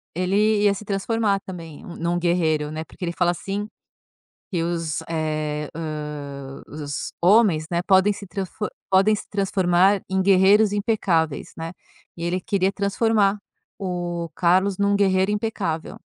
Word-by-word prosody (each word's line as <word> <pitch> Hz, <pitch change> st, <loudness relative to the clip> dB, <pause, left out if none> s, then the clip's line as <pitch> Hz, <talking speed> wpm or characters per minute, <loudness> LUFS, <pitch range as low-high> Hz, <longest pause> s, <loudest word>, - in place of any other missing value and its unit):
Ele 205 Hz, +4 st, +2 dB
ia 200 Hz, -1 st, +4 dB
se 215 Hz, -, -8 dB
transformar 200 Hz, 0 st, 0 dB
também 170 Hz, -5 st, -9 dB
um 170 Hz, -, -9 dB
num 170 Hz, +1 st, -1 dB
guerreiro, 160 Hz, -4 st, +1 dB
né, 155 Hz, +1 st, -5 dB
porque 180 Hz, -, -9 dB
ele 170 Hz, -, -2 dB
fala 175 Hz, 0 st, +2 dB
assim 200 Hz, +4 st, -4 dB, 0.8 s
que 175 Hz, -5 st, -1 dB
os 165 Hz, -2 st, -2 dB
eh, 155 Hz, -2 st, -2 dB
hã, 150 Hz, -3 st, -6 dB
o -, -, -14 dB
os 145 Hz, 0 st, -4 dB
homens, 185 Hz, -4 st, +4 dB
né, 170 Hz, 0 st, +1 dB
podem 190 Hz, +2 st, +4 dB
se 200 Hz, 0 st, -10 dB
tranfor 195 Hz, +2 st, -4 dB, 0.2 s
podem 195 Hz, +3 st, +4 dB
se -, -, -8 dB
transformar 190 Hz, -1 st, +2 dB
em 190 Hz, 0 st, +1 dB
guerreiros 195 Hz, +2 st, +5 dB
impecáveis, 185 Hz, -, 0 dB
né, 165 Hz, 0 st, -5 dB, 0.5 s
e 170 Hz, -, -6 dB
ele 175 Hz, +2 st, 0 dB
queria 195 Hz, -1 st, +1 dB
transformar 205 Hz, 0 st, +2 dB, 0.4 s
o 175 Hz, -3 st, -3 dB
Carlos 185 Hz, +2 st, +2 dB
num 200 Hz, 0 st, +2 dB
guerreiro 190 Hz, 0 st, +2 dB
impecável. 205 Hz, -7 st, -3 dB
185 Hz, 150 wpm, -23 LUFS, 165-200 Hz, 0.8 s, guerreiros